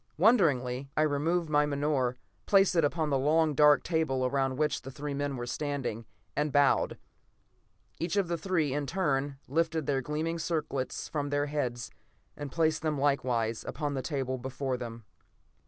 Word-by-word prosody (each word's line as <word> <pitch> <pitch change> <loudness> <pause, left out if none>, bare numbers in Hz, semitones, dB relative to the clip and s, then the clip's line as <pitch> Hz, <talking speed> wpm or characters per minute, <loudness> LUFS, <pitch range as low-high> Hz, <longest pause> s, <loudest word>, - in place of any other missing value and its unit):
Wonderingly, 140 - +3
I 155 - +4
removed 160 +4 +1
my 150 -1 +3
menore, 140 -3 0 0.3
placed 195 -2 +4
it 165 - +4
upon 155 +1 0
the 135 - +2
long, 155 +3 +3
dark 150 +1 +5
table 155 -6 0
around 135 0 0
which 150 0 0
the 130 - -8
three 145 +2 -5
men 140 0 -2
were 120 - -4
standing, 125 -4 -3 0.3
and 150 0 0
bowed. 145 -1 +3 1.0
Each 170 +3 -1
of 195 -3 +2
the 170 - -1
three, 165 -5 0
in 145 0 -2
turn, 140 -5 0
lifted 160 +2 0
their 135 -1 +1
gleaming 155 +5 -2
circlets 150 -5 -2
from 145 -2 -2
their 145 0 +1
heads, 125 -6 -3 0.4
and 145 -2 -6
placed 160 0 +1
them 155 -2 -1
likewise 125 -5 0
upon 145 -1 -3
the 135 - -2
table 130 -2 -2
before 130 +1 -3
them. 115 -2 -7
145 Hz, 165 wpm, -30 LUFS, 135-155 Hz, 1.0 s, dark